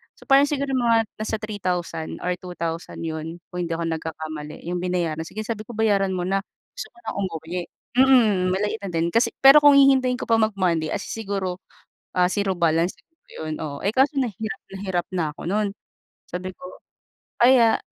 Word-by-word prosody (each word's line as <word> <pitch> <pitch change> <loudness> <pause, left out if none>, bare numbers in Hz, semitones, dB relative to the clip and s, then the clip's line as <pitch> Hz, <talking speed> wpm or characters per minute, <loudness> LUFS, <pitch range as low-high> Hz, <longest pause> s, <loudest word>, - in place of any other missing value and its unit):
So, - - -17
parang 275 +1 +5
siguro 280 -1 -2
mga 235 -3 +3 0.2
nasa 215 0 -2
3,000 180 -6 -4
or 180 0 0
2,000 170 -2 -5
'yon 160 0 -4 0.2
kung 180 -1 -3
hindi - - -7
ako 170 - -3
nagkakamali, 155 -2 -5
yung 175 0 -2
binayaran. 175 -3 -1
Sige 215 +4 -5
sabi 215 -1 -5
ko, 240 - -8
"Bayaran 200 -4 +2
mo 180 - -2
na, 195 +2 +1 0.3
gusto - - -7
ko - - -29
nang - - -5
umuwi." 175 -2 -3 0.4
Mm, 220 -9 +5
maliit 205 +3 -1
na 200 - -3
din, 165 0 0
kasi 230 +5 +2
pero 275 +2 +10
kung 290 -1 +7
hihintayin 265 -2 +5
ko - - -4
pa 230 - +4
mag 220 0 +3
Monday 170 -5 +1
as - - -2
in - - -7
siguro, 190 -2 -3 0.6
ah, 180 0 +3
zero 200 -1 0
balance 170 +1 +1
siguro 325 0 -33 0.2
'yon. 155 - -4
Oo, 150 -3 -5
eh, 200 - +1
kaso 275 +4 +4
na 250 - 0
hirap 220 +5 -6
na 195 - -8
hirap 180 -2 -1
na 175 -3 0
ako - - -14
no'n, 210 +1 +1 0.6
sabi 180 +1 -5
ko. - - -25 0.8
Kaya, 240 -3 +6
190 Hz, 195 wpm, -23 LUFS, 170-225 Hz, 0.8 s, pero